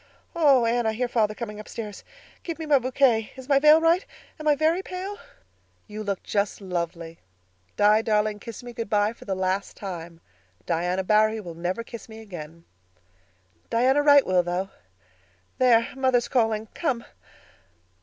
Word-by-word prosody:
Oh, 280 Hz, -7 st, +5 dB
Anne, 235 Hz, 0 st, +1 dB
I 220 Hz, -, +1 dB
hear 250 Hz, +3 st, -1 dB
father 215 Hz, -3 st, 0 dB
coming 210 Hz, -3 st, -6 dB
upstairs. 210 Hz, -1 st, -8 dB, 0.4 s
Give 335 Hz, -2 st, -5 dB
me 320 Hz, -, -5 dB
my 290 Hz, -3 st, +4 dB
bouquet. 250 Hz, -3 st, +2 dB
Is 260 Hz, -1 st, -11 dB
my 275 Hz, -1 st, +4 dB
veil 305 Hz, +2 st, +7 dB
right? 330 Hz, +3 st, +3 dB, 0.4 s
Am 310 Hz, -, -5 dB
I 295 Hz, -, +5 dB
very 320 Hz, +5 st, +1 dB
pale?" 385 Hz, +3 st, -6 dB, 0.7 s
"You 215 Hz, 0 st, -7 dB
look 200 Hz, -3 st, -3 dB
just 200 Hz, -1 st, -1 dB
lovely. 170 Hz, -3 st, -5 dB, 0.6 s
Di, 210 Hz, +1 st, +5 dB
darling, 215 Hz, -1 st, 0 dB
kiss 230 Hz, +2 st, -9 dB
me 240 Hz, 0 st, -9 dB
good 230 Hz, -3 st, -5 dB
bye 210 Hz, +1 st, +2 dB
for -, -, -15 dB
the 195 Hz, -, -2 dB
last 185 Hz, +1 st, -2 dB
time. 170 Hz, -4 st, -7 dB, 0.5 s
Diana 180 Hz, +2 st, -1 dB
Barry 215 Hz, +2 st, +3 dB
will 175 Hz, -5 st, -8 dB
never 175 Hz, +7 st, -3 dB
kiss 230 Hz, 0 st, -10 dB
me 220 Hz, 0 st, -10 dB
again." 170 Hz, -6 st, -10 dB, 1.0 s
"Diana 260 Hz, +5 st, +3 dB
Wright 285 Hz, -1 st, +6 dB
will, 185 Hz, -1 st, +3 dB
though. 180 Hz, +2 st, -3 dB, 0.9 s
There, 235 Hz, -2 st, +4 dB
mother's 260 Hz, -3 st, +2 dB
calling. 225 Hz, -3 st, +1 dB
Come." 260 Hz, -8 st, -2 dB
220 Hz, 160 wpm, -25 LUFS, 195-260 Hz, 1.0 s, veil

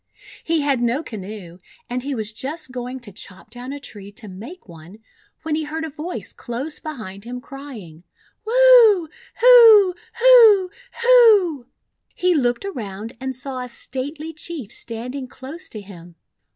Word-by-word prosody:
He 325 Hz, -1 st, 0 dB
had 280 Hz, -4 st, 0 dB
no 240 Hz, +6 st, 0 dB
canoe, 195 Hz, -, -9 dB, 0.3 s
and 250 Hz, +1 st, -4 dB
he 275 Hz, +1 st, -4 dB
was 220 Hz, -2 st, -4 dB
just 275 Hz, +4 st, -6 dB
going 250 Hz, +1 st, -6 dB
to 220 Hz, -4 st, -12 dB
chop 190 Hz, +2 st, -12 dB
down 245 Hz, +2 st, -8 dB
a 285 Hz, -, -6 dB
tree 205 Hz, -7 st, -11 dB
to 220 Hz, 0 st, -11 dB
make 225 Hz, -, -11 dB
one, 170 Hz, +3 st, -14 dB, 0.5 s
when 320 Hz, -1 st, -3 dB
he 310 Hz, +1 st, -1 dB
heard 320 Hz, +2 st, -4 dB
a 315 Hz, -, -7 dB
voice 315 Hz, +5 st, -6 dB
close 270 Hz, +6 st, -6 dB
behind 215 Hz, -11 st, -8 dB
him 245 Hz, +2 st, -7 dB
crying: 245 Hz, -, -11 dB, 0.2 s
— -, -, -37 dB
"Wu! 470 Hz, -7 st, +6 dB, 0.3 s
Hu! 455 Hz, -6 st, +8 dB, 0.2 s
Hu! 455 Hz, -7 st, +6 dB, 0.3 s
Hu!" 420 Hz, -, +5 dB, 0.5 s
He 360 Hz, 0 st, +1 dB
looked 245 Hz, +1 st, 0 dB
around 220 Hz, -, -7 dB
and 265 Hz, 0 st, -5 dB
saw 260 Hz, +1 st, -6 dB
a 250 Hz, 0 st, -6 dB
stately 290 Hz, +6 st, -5 dB
Chief 305 Hz, -7 st, -7 dB
standing 250 Hz, +4 st, -5 dB
close 280 Hz, +8 st, -9 dB
to 215 Hz, -, -8 dB
him. 175 Hz, -4 st, -14 dB
265 Hz, 155 wpm, -21 LUFS, 225-330 Hz, 0.5 s, Hu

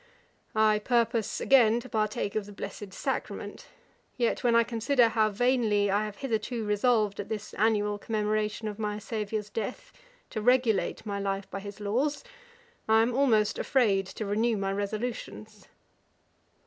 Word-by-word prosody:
'I 215 Hz, -1 st, +4 dB
purpose 230 Hz, -1 st, 0 dB
again 240 Hz, -4 st, +5 dB
to 240 Hz, -, -10 dB
partake 215 Hz, -3 st, -1 dB
of 210 Hz, -2 st, -2 dB
the -, -, -10 dB
blessed 205 Hz, 0 st, -7 dB
sacrament; -, -, -4 dB, 0.5 s
yet 240 Hz, +1 st, 0 dB
when 240 Hz, -1 st, +3 dB
I 235 Hz, -, +6 dB
consider 235 Hz, +1 st, +2 dB
how 220 Hz, -1 st, +2 dB
vainly 215 Hz, -3 st, +2 dB
I 205 Hz, +2 st, +1 dB
have 210 Hz, -1 st, -7 dB
hitherto 225 Hz, -1 st, -2 dB
resolved 210 Hz, -1 st, +2 dB
at 205 Hz, 0 st, -5 dB
this 215 Hz, -2 st, -5 dB
annual 210 Hz, -1 st, +1 dB
commemoration 215 Hz, 0 st, -1 dB
of 210 Hz, 0 st, -6 dB
my 210 Hz, -1 st, -2 dB
Saviour's 210 Hz, -1 st, -4 dB
death, 240 Hz, -, -5 dB, 0.4 s
to 215 Hz, -, -3 dB
regulate 240 Hz, -4 st, +2 dB
my 200 Hz, -1 st, -3 dB
life 195 Hz, -1 st, -2 dB
by 195 Hz, -, -4 dB
his 200 Hz, +1 st, -9 dB
laws, 250 Hz, +9 st, -1 dB, 0.7 s
I 220 Hz, 0 st, +6 dB
am 240 Hz, +1 st, 0 dB
almost 225 Hz, -6 st, +2 dB
afraid 205 Hz, -8 st, +2 dB
to 215 Hz, -, -6 dB
renew 220 Hz, +3 st, +1 dB
my 195 Hz, 0 st, -1 dB
resolutions.' 215 Hz, 0 st, -5 dB
215 Hz, 150 wpm, -28 LUFS, 205-235 Hz, 0.7 s, I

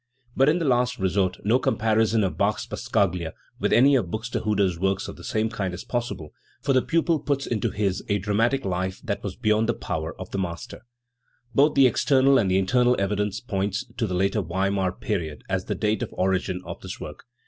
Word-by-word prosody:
But 135 Hz, +3 st, +4 dB
in 160 Hz, -, +3 dB
the 170 Hz, -, -1 dB
last 125 Hz, -1 st, +2 dB
resort 95 Hz, 0 st, 0 dB
no 115 Hz, +6 st, +3 dB
comparison 110 Hz, -1 st, +2 dB
of 95 Hz, -, -1 dB
Bach's -, -, 0 dB
passacaglia 90 Hz, -4 st, -1 dB, 0.3 s
with -, -, 0 dB
any 135 Hz, +4 st, +6 dB
of 120 Hz, -9 st, +1 dB
Buxtehude's 105 Hz, -4 st, -1 dB
works 95 Hz, +1 st, 0 dB
of -, -, -7 dB
the -, -, -13 dB
same 110 Hz, +1 st, 0 dB
kind 100 Hz, -5 st, -3 dB
is 90 Hz, -, -8 dB
possible, 120 Hz, -11 st, -4 dB, 0.3 s
for 140 Hz, -, 0 dB
the 130 Hz, -, +4 dB
pupil 165 Hz, +1 st, +1 dB
puts 140 Hz, -2 st, -1 dB
into 110 Hz, -4 st, -1 dB
his 100 Hz, -2 st, -1 dB
a 100 Hz, -, +2 dB
dramatic 110 Hz, +7 st, +1 dB
life 95 Hz, 0 st, -2 dB
that 100 Hz, -6 st, -3 dB
was 95 Hz, -3 st, -5 dB
beyond 110 Hz, -1 st, +1 dB
the 120 Hz, -, +1 dB
power 80 Hz, +1 st, -4 dB
of 95 Hz, -, -8 dB
the 100 Hz, -, -2 dB
master. 90 Hz, +5 st, -6 dB, 0.7 s
Both 145 Hz, +5 st, +4 dB
the 135 Hz, -1 st, +6 dB
external 135 Hz, +2 st, +4 dB
and 95 Hz, -, +1 dB
the 95 Hz, -, +3 dB
internal 125 Hz, +6 st, +3 dB
evidence 105 Hz, +1 st, -1 dB
point 100 Hz, -5 st, -1 dB, 0.2 s
to 115 Hz, -, 0 dB
the 90 Hz, -, -2 dB
later 100 Hz, +3 st, +1 dB
Weimar 95 Hz, +1 st, 0 dB
period 80 Hz, -5 st, -4 dB
as 95 Hz, -1 st, -1 dB
the -, -, -2 dB
date 110 Hz, +1 st, 0 dB
of 120 Hz, -, -2 dB
origin 95 Hz, -1 st, 0 dB
of -, -, -7 dB
this -, -, -7 dB
work. -, -, -9 dB
105 Hz, 205 wpm, -25 LUFS, 95-120 Hz, 0.7 s, any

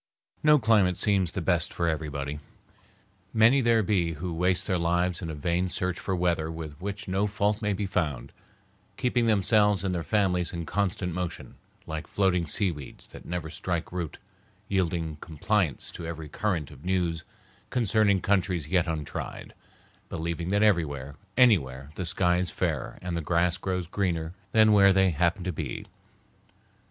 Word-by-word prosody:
No 150 Hz, 0 st, +6 dB
climate 105 Hz, -7 st, +3 dB
seems 95 Hz, -4 st, +2 dB
the 95 Hz, -, -3 dB
best 85 Hz, -1 st, +2 dB
for 85 Hz, -, -1 dB
everybody. 75 Hz, -2 st, -3 dB, 1.0 s
Many 115 Hz, +5 st, +6 dB
there 115 Hz, -2 st, +3 dB
be 90 Hz, -5 st, +1 dB
who 85 Hz, +3 st, -4 dB
waste 90 Hz, +2 st, +1 dB
their 95 Hz, -3 st, 0 dB
lives 85 Hz, +2 st, +1 dB
in 85 Hz, -, -4 dB
a 80 Hz, -, -4 dB
vain 85 Hz, +5 st, 0 dB
search 90 Hz, 0 st, -2 dB
for 95 Hz, -, -2 dB
weather 85 Hz, -3 st, 0 dB
with 80 Hz, -2 st, -6 dB
which 100 Hz, +2 st, -5 dB
no 95 Hz, +3 st, +1 dB
fault 105 Hz, +1 st, 0 dB
may 105 Hz, -2 st, +1 dB
be 100 Hz, +1 st, -2 dB
found, 80 Hz, -8 st, -2 dB, 0.7 s
keeping 120 Hz, -2 st, +1 dB
themselves 105 Hz, -2 st, +3 dB
and 95 Hz, -2 st, 0 dB
their 85 Hz, -, -1 dB
families 90 Hz, +1 st, +1 dB
in 85 Hz, -1 st, -4 dB
constant 95 Hz, -2 st, -1 dB
motion, 90 Hz, -1 st, -5 dB, 0.3 s
like 80 Hz, +1 st, -5 dB
floating 90 Hz, -4 st, +1 dB
seaweeds 80 Hz, -6 st, -3 dB
that -, -, -12 dB
never 85 Hz, -2 st, -4 dB
strike 85 Hz, +1 st, -2 dB
root, 85 Hz, -4 st, -4 dB, 0.5 s
yielding 85 Hz, -5 st, -1 dB
compliance 80 Hz, -, -1 dB
to 85 Hz, -, -7 dB
every 80 Hz, -2 st, -6 dB
current 85 Hz, -4 st, -2 dB
of 70 Hz, -1 st, -14 dB
news 90 Hz, -3 st, 0 dB, 0.5 s
concerning 105 Hz, -4 st, +2 dB
countries 90 Hz, -6 st, +1 dB
yet 90 Hz, -1 st, +2 dB
untried, 80 Hz, -3 st, -5 dB, 0.6 s
believing 85 Hz, 0 st, -3 dB
that 100 Hz, +2 st, +2 dB
everywhere, 70 Hz, -9 st, +1 dB, 0.2 s
anywhere, 70 Hz, -, +3 dB
the 90 Hz, 0 st, -4 dB
sky 90 Hz, +1 st, +2 dB
is 90 Hz, -2 st, -1 dB
fairer -, -, -2 dB
and 90 Hz, -1 st, -3 dB
the 85 Hz, -, -1 dB
grass 85 Hz, +2 st, +1 dB
grows 90 Hz, -1 st, -2 dB
greener 85 Hz, -3 st, -2 dB, 0.2 s
than 110 Hz, -1 st, +5 dB
where 100 Hz, -1 st, +7 dB
they 95 Hz, -1 st, +4 dB
happen 85 Hz, +4 st, +1 dB
to 90 Hz, -, -1 dB
be. 75 Hz, -5 st, -5 dB
90 Hz, 160 wpm, -27 LUFS, 80-100 Hz, 1.0 s, where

